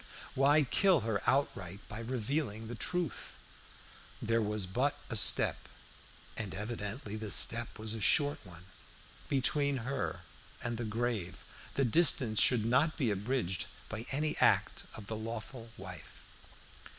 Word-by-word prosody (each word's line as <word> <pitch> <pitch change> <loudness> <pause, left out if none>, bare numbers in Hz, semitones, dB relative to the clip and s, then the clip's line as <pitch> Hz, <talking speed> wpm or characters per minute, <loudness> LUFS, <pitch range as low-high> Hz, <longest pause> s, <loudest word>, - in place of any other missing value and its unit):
Why 145 +3 +4
kill 175 +4 +3
her 110 -2 -1
outright 100 -9 0
by 105 - -6
revealing 115 -1 -2
the 120 - -6
truth? 165 - -2 0.8
There 115 +1 +1
was 105 -2 -1
but 125 +10 0
a - - -1
step 105 - +3 0.7
and 105 -4 -4
evidently 105 +1 -5
the 110 -1 -5
step 115 +4 +2
was 110 0 -1
a 110 - -5
short 145 +9 +3
one 90 -3 -12 0.6
between 140 +1 +2
her 140 +1 -3 0.4
and 120 -1 -3
the 120 - -2
grave. 110 -4 -3 0.3
The 135 - +2
distance 125 -5 +4
should 120 -4 +4
not 135 +7 +2
be 125 -7 +1
abridged 100 -2 -1 0.2
by 110 +3 -6
any 150 +3 -1
act - - +2
of 110 - -9
the 110 - -4
lawful 115 +2 -6
wife. 90 -2 -10
115 Hz, 140 wpm, -32 LUFS, 105-135 Hz, 0.8 s, Why